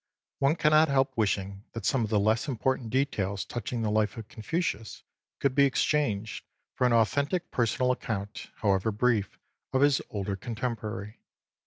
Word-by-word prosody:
One 140 +3 +3
cannot 155 0 +5
help 135 -1 +1
wishing 100 -2 -1
that 115 -4 -5
some 130 +2 +2
of 110 - -2
the 105 -1 +2
less 110 +5 +2
important 130 -2 -1
details 100 -7 0
touching 120 0 -4
the 105 - 0
life 105 +1 +1
of 110 -2 -7
Confucius 115 - -3 0.4
could 140 -2 +1
be 140 +1 +5
exchanged 125 -6 0 0.3
for 125 - +2
an 120 - +2
authentic 140 - +1
personal 125 +1 +1
account, 105 -5 -4
however 100 +1 +1
brief, 105 -2 +1 0.3
of 130 - +2
his 145 -1 +4
older 100 -1 -3
contemporary. 110 -1 -5
115 Hz, 155 wpm, -28 LUFS, 105-135 Hz, 0.4 s, cannot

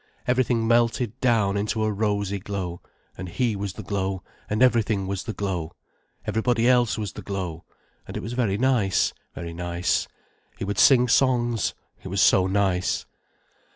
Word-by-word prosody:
Everything 125 -2 +2
melted 120 0 +1
down 110 -6 +2
into 105 +2 -1
a 110 - +1
rosy 100 -1 -1
glow, 95 -3 -5 0.3
and 95 0 -7
he 115 +4 0
was 100 -1 -4
the - - -8
glow, 95 -2 -2 0.3
and 110 +4 +2
everything 110 -5 +2
was 95 0 -3
the - - -3
glow, 90 -6 -3 0.5
everybody 115 +1 +1
else 120 -3 +3
was 105 -3 -4
the - - -8
glow, 90 -5 -5 0.4
and - - -6
it - - -5
was 115 +4 -5
very 115 -6 0
nice, 120 -6 +2 0.2
very 85 -1 -6
nice. 85 +1 -1 0.5
He - - -4
would 100 -1 -2
sing 125 -2 +6
songs, 120 -3 +2 0.3
it - - -9
was 95 +1 -2
so 95 0 +5
nice. 95 -2 0
100 Hz, 160 wpm, -25 LUFS, 95-120 Hz, 0.5 s, sing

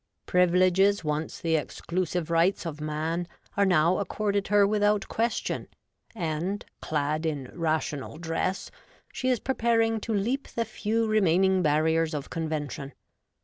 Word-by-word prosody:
Privileges 185 +2 +3
once 150 +1 -2
the 165 -1 +1
exclusive 170 +2 -2
rights 170 +3 +2
of 155 -2 -5
Man 160 +3 -2 0.3
are 200 0 +3
now 175 0 +3
accorded 200 +1 -1
her 205 0 +5
without 205 0 +2
question, 230 0 -1 0.5
and, 175 +2 -2 0.2
clad 150 +1 -1
in 145 -6 -3
Rational 155 -4 -2
Dress, 170 +3 -2 0.4
she 255 - -1
is 250 -3 +2
preparing 225 -3 +1
to 225 - -5
leap 230 +7 0
the 230 - -2
few 225 +2 -1
remaining 190 -3 +3
barriers 160 +1 +2
of 145 - -5
convention. 150 -3 -4
180 Hz, 130 wpm, -27 LUFS, 155-205 Hz, 0.5 s, her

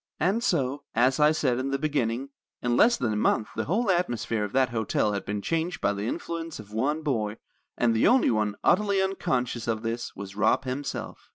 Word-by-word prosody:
"And 210 +6 +1
so, 140 - 0
as 130 +4 +3
I 150 0 +6
said 130 -6 +1
in 135 +1 -2
the 135 - 0
beginning, 135 -3 -1 0.3
in 120 0 0
less 235 - +5
than 115 -3 -1
a - - -1
month 105 0 +1
the 110 - -2
whole 205 - +1
atmosphere 120 - 0
of 105 - -4
that 130 -1 +3
hotel 110 -2 0
had 100 - -3
been 105 0 -3
changed 165 +1 -1
by 100 - +1
the 100 +2 -3
influence 165 +3 -4
of 105 -1 -11
one 145 +8 0
boy; 110 -7 -1 0.4
and 120 -2 +3
the 110 - +4
only 255 - +4
one 105 -2 0
utterly 200 +1 +3
unconscious 130 -12 -1
of 110 -1 -1
this 115 +1 -4
was 100 0 -8
Rob 105 +5 +2
himself." 135 +2 -5
125 Hz, 205 wpm, -27 LUFS, 110-160 Hz, 0.4 s, I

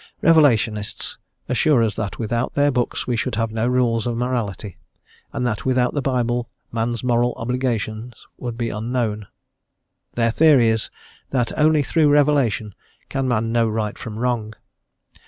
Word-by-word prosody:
Revelationists 120 -10 +2 0.3
assure 125 +1 +3
us 110 -1 -1
that 105 -3 -4
without 120 +2 -2
their 145 0 +3
books 125 -2 -1
we 125 - -1
should 115 +1 -2
have 115 0 -1
no 110 +1 -1
rules 120 -2 +1
of 120 -1 -2
morality, 115 -6 -3 0.6
and 125 - -2
that 110 -4 -2
without 125 -1 +1
the 145 - -1
Bible 120 -2 -1 0.2
man's 115 0 -2
moral 120 0 +1
obligations 120 -1 -3
would 120 -2 -5
be 115 -1 -2
unknown. 110 -2 -2 0.9
Their 115 -1 +2
theory 140 -4 +5
is 110 0 -1 0.4
that 125 -4 -1
only 155 -1 +3
through 155 0 +2
revelation 140 -8 +2 0.4
can 135 -1 -1
man 115 -2 0
know 115 -1 +2
right 105 -1 -2
from 110 -2 -7
wrong. 115 -3 -2
120 Hz, 150 wpm, -21 LUFS, 110-125 Hz, 0.9 s, theory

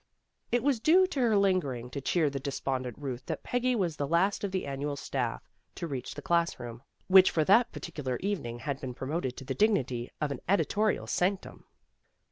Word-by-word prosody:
It 240 -1 +2
was 275 -4 +2
due 350 +10 +5
to 365 -7 -4
her 230 -4 +3
lingering 145 -12 +1
to 140 - -4
cheer 155 +1 +1
the 135 - -3
des 135 +1 -4
pondent 130 -2 -1
Euth 130 -3 -5
that - - -4
Peggy 245 0 0
was 180 -8 0
the 145 - -1
last 185 +7 +2
of 200 - -1
the 185 -1 -2
Annual 140 +1 -3
staff 130 -4 -3 0.3
to 170 - -4
reach 135 -6 -5
the - - -8
class 170 -3 +1
room, 120 -1 -7 0.2
which 185 0 +7
for 160 - +1
that 225 +9 +5
particular 145 -7 -4
evening 180 -12 -3
had 140 +2 -3
been 125 -2 -5
promoted 130 -1 -3
to 135 - -8
the 135 - -2
dignity 130 - +1
of 150 -2 -1
an - - -4
editorial 205 +2 +2
sanctum. 185 +2 -1
155 Hz, 200 wpm, -29 LUFS, 130-200 Hz, 0.3 s, which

